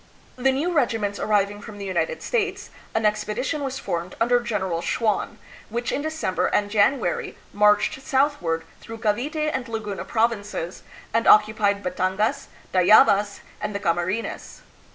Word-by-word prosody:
The 265 +1 +2
new 295 +7 -1
regiments 225 - 0
arriving 205 -1 +1
from 210 -1 -10
the 200 - -6
United 475 - -2
States, 410 -4 -2 0.2
an 225 -1 +1
expedition 240 +8 -1
was 270 -1 -3
formed 175 -7 -4
under 245 +1 +3
Gen 235 -4 -2
eral 170 -3 -2
Schwan, 215 +2 -1 0.3
which 240 +3 -2
in 285 - -1
December 315 -11 -1
and 205 0 0
January 210 -3 +1 0.2
marched 210 +5 +3
southward 265 - 0 0.2
through 225 0 -9
Cavite 290 +9 -1
and 260 -1 -3
Laguna 210 -3 -4
provinces 215 -6 -1 0.3
and 230 - +1
oc 210 - +9
cupied 205 -2 -1
Batangas, 185 +3 -1 0.3
Tayabas, 200 +2 +5 0.2
and 210 -1 -3
the - - -1
Camarines. 175 +5 -2
215 Hz, 145 wpm, -24 LUFS, 200-255 Hz, 0.3 s, oc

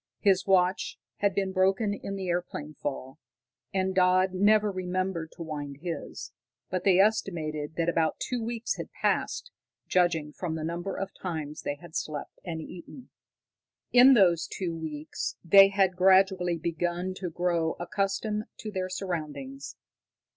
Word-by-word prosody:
His 195 -2 +3
watch 185 -1 +2 0.2
had 200 -2 +1
been 195 -1 0
broken 195 +3 +2
in 200 -1 -5
the 190 -1 -4
airplane 170 -4 -3
fall; 135 -2 -5 0.5
and 190 0 0
Dodd 185 0 +3
never 210 +2 +4
remembered 185 -3 -2
to 170 - -7
wind 145 -3 -6
his, 170 -2 -5 0.4
but 185 -1 -1
they 190 -2 +5
estimated 160 -7 +1
that 165 0 0
about 165 -2 +1
two 245 -2 -2
weeks 230 0 -2
had - - -7
passed, 485 - -1 0.4
judging 165 -4 +1
from 165 -1 -3
the 160 - -4
number 170 +4 -3
of 195 - -3
times 155 -4 -5
they 145 - -3
had 160 +2 -14
slept 150 -2 -4
and 165 -3 -4
eaten. 180 - -11 0.8
In 255 +2 +8
those 175 -6 +4
two 175 -4 -3
weeks 155 -2 -5
they 195 +3 +9
had 195 -2 +2
gradually 185 -1 +4
begun 175 +3 -2
to 185 -2 -4
grow 170 -1 0
accustomed 200 +4 -1
to 215 - -6
their 185 -2 -2
surroundings. 145 -8 -5
180 Hz, 145 wpm, -28 LUFS, 160-195 Hz, 0.8 s, they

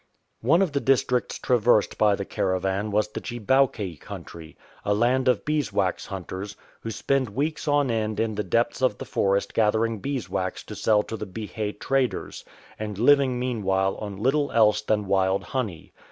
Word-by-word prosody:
One 165 +11 +4
of 180 - -1
the 140 - 0
districts 125 -2 +1
traversed 120 -3 +2
by 105 -2 +4
the 100 - -5
caravan 95 +3 -1
was 105 +1 +1
the - - -6
Chibowke 120 - 0
country, 80 -2 -10 0.3
a 105 - +1
land 125 +4 +2
of 125 -4 +2
beeswax 105 -12 0
hunters, 95 +1 -6 0.2
who 115 - -6
spend 130 +3 0
weeks 145 +10 -2
on 145 -3 +2
end 110 -2 -1
in 110 -1 0
the 105 0 -2
depths 115 +7 0
of 125 -6 +2
the - - -7
forest 100 0 0
gathering 110 0 +1
beeswax 110 -8 -3
to - - -9
sell 105 -1 +3
to 110 - -6
the 105 - -6
Bihe 105 +1 -5
traders, 135 -2 -1 0.4
and 105 -2 -4
living 130 +2 +4
meanwhile 95 -6 0
on 100 -2 -6
little 135 +7 +1
else 105 -2 +4
than 105 -1 0
wild 95 0 +1
honey. 110 - -4
110 Hz, 170 wpm, -25 LUFS, 100-130 Hz, 0.4 s, One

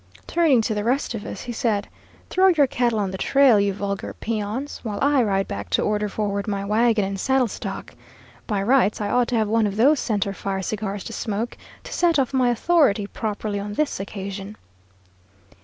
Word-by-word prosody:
"Turning 305 -9 +3
to 220 - 0
the 210 -1 -2
rest 255 +3 0
of 215 -2 -6
us, - - -6
he 245 - -5
said, 220 -3 -1 0.4
'Throw 375 +1 +4
your 320 -6 +5
cattle 240 -3 0
on 200 -3 -1
the 190 - -6
trail, 270 -6 +5
you 200 0 +2
vulgar 200 0 -4
peons, 225 +5 -4
while 210 -4 -4
I 280 -1 +3
ride 195 -3 +1
back 100 0 -6
to - - 0
order 210 0 0
forward 200 0 -2
my 200 -1 -2
wagon 220 0 +2
and 195 0 -4
saddle 265 +3 +2
stock. - - -6 0.5
By 205 -3 -1
rights, 240 -2 +3
I 205 -1 -2
ought 245 -1 +2
to 250 - -1
have 220 -2 +2
one 220 0 +2
of 200 - -4
those 275 +7 +4
centre 205 -3 -1
fire 195 0 -3
cigars 205 -1 -3
to 230 - -7
smoke, 220 +3 -3 0.3
to - - -8
set 340 -2 +2
off 270 -1 0
my 255 -2 +3
authority 240 -5 +3
properly 205 0 -3
on 205 +1 -5
this 305 -5 -1
occasion.' 195 +1 -6
215 Hz, 200 wpm, -23 LUFS, 200-250 Hz, 0.5 s, your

